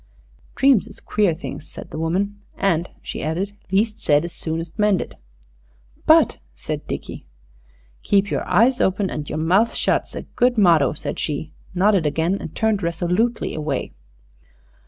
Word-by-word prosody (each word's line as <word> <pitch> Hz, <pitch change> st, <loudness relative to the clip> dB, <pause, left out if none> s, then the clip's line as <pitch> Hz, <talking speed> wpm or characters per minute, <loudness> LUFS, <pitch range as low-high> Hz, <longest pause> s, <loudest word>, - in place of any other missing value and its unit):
"Dreams 265 Hz, -6 st, +4 dB
is 215 Hz, -, -12 dB
queer 205 Hz, -6 st, +1 dB
things," 160 Hz, -2 st, -7 dB
said -, -, -10 dB
the 155 Hz, -, -5 dB
woman. 200 Hz, +5 st, -1 dB, 0.2 s
"And," 175 Hz, -3 st, +1 dB
she -, -, -5 dB
added, 185 Hz, +6 st, -2 dB, 0.2 s
"least 215 Hz, +3 st, +1 dB
said 145 Hz, +2 st, +3 dB
is 170 Hz, -, -7 dB
soonest 165 Hz, +4 st, -5 dB
mended." 210 Hz, -3 st, +1 dB, 0.9 s
"But -, -, +5 dB
..." -, -, -35 dB
said -, -, -5 dB
Dickie. -, -, -6 dB, 0.7 s
"Keep 200 Hz, 0 st, +2 dB
your -, -, 0 dB
eyes 245 Hz, +4 st, +4 dB
open 190 Hz, +1 st, +1 dB
and 150 Hz, -1 st, -5 dB
your 155 Hz, -, -3 dB
mouth 185 Hz, +9 st, +2 dB
shut's -, -, 0 dB
a -, -, -5 dB
good 245 Hz, 0 st, +1 dB
motto," 165 Hz, -, +5 dB
said 150 Hz, -, -5 dB
she, 150 Hz, +1 st, -3 dB, 0.2 s
nodded 190 Hz, -3 st, +3 dB
again, 165 Hz, +5 st, +1 dB
and 160 Hz, -, -8 dB
turned 220 Hz, -3 st, +1 dB
resolutely 180 Hz, +7 st, 0 dB
away. 150 Hz, -4 st, -3 dB
185 Hz, 155 wpm, -22 LUFS, 160-210 Hz, 0.9 s, But